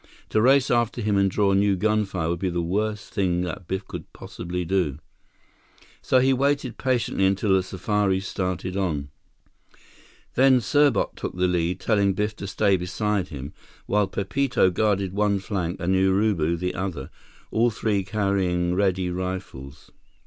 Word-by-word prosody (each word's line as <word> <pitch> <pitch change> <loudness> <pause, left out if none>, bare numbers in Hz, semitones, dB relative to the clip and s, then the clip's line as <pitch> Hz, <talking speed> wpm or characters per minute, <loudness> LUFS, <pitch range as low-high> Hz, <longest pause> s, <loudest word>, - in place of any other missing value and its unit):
To 110 - +2
race 135 +2 +4
after 120 0 +1
him 105 -2 0
and 100 0 +3
draw 100 0 +2
new 100 0 +3
gunfire 100 -4 0
would 85 0 -2
be 95 - -1
the 85 0 -2
worst 105 +4 -2
thing 90 -4 +1
that 90 0 -5
Biff 95 +1 -3
could - - -8
possibly 90 0 -5
do. 85 -6 0 1.0
So 130 - +2
he 130 +1 +4
waited 140 -1 0
patiently 125 -7 +1
until 95 +1 +1
the 95 - +4
safari 95 +1 0
started 95 -1 -3
on. 80 -8 -2 1.2
Then 130 0 +5
Serbot 140 0 +2
took - - -5
the 90 0 +2
lead, 90 0 0
telling 100 -3 +2
Biff 105 +2 -2
to 100 - -6
stay 100 -1 +2
beside 95 +1 -1
him, 70 -3 -8 0.3
while 105 -1 +1
Pepito 100 0 +1
guarded 100 -1 0
one 100 0 +1
flank 95 -3 -3
and 90 +2 0
Urubu 95 -3 +2
the 90 +2 -2
other, 90 -7 -4 0.4
all 115 +2 +3
three 105 -3 -1
carrying 95 -3 0
ready 95 -1 +1
rifles. 90 -7 -6
95 Hz, 155 wpm, -24 LUFS, 90-105 Hz, 1.2 s, Then